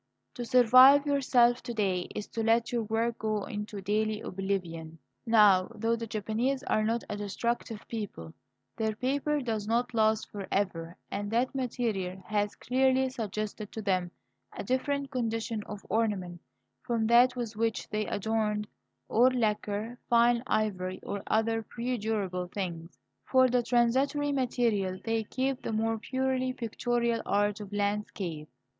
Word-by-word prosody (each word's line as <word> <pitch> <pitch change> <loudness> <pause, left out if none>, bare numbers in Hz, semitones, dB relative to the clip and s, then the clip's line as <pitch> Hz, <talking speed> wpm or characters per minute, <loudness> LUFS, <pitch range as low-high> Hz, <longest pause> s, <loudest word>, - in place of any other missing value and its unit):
To 245 - -5
survive 255 +4 +7
yourself, 250 -4 +3
to 240 -1 -6
day, 190 -4 0
is 210 - -3
to 225 - -3
let 230 +1 +2
your 240 -1 0
work 225 +2 -1
go 215 -2 -1
into 210 0 -5
daily 215 +2 0
oblivion. 180 -5 -4 0.3
Now, 205 -5 +6
though 225 +2 +1
the 230 0 -5
Japanese 225 +6 -1
are 215 - +1
not 230 +2 0
a - - -4
destructive 215 +2 -3
people, 195 - -6 0.4
their 220 -1 -1
paper 285 +5 0
does 220 -4 -3
not 240 +2 0
last 220 -1 +2
for 200 -2 -6
ever, 170 -4 -1
and 205 0 -3
that 240 +5 +1
material 220 -8 -2
has 205 -1 -1
clearly 260 +1 +2
suggested 215 -2 -4
to 220 - -4
them 185 -3 0 0.4
a - - -5
different 275 +2 -1
condition 225 -3 -2
of 210 -1 -8
ornament 190 -5 -1 0.4
from 235 -3 -1
that 240 +3 +5
with 235 -3 -4
which 225 0 -1
they 215 0 -2
adorned 210 0 -1 0.4
old 255 +3 +4
lacquer, 215 0 -1
fine 235 0 +4
ivory, 185 -4 -1
or 200 0 -4
other 225 +1 +1
perdurable 220 -6 -2
things. 175 -3 -5 0.3
For 260 -1 +4
the 250 0 +2
transitory 260 +5 +2
material 230 -8 0
they 225 -1 -1
keep 265 +3 -2
the - - -4
more 225 +1 0
purely 260 +1 -1
pictorial 235 0 -1
art 205 +1 +1
of 205 -1 -8
landscape. 200 -6 -2
225 Hz, 145 wpm, -29 LUFS, 205-245 Hz, 0.4 s, survive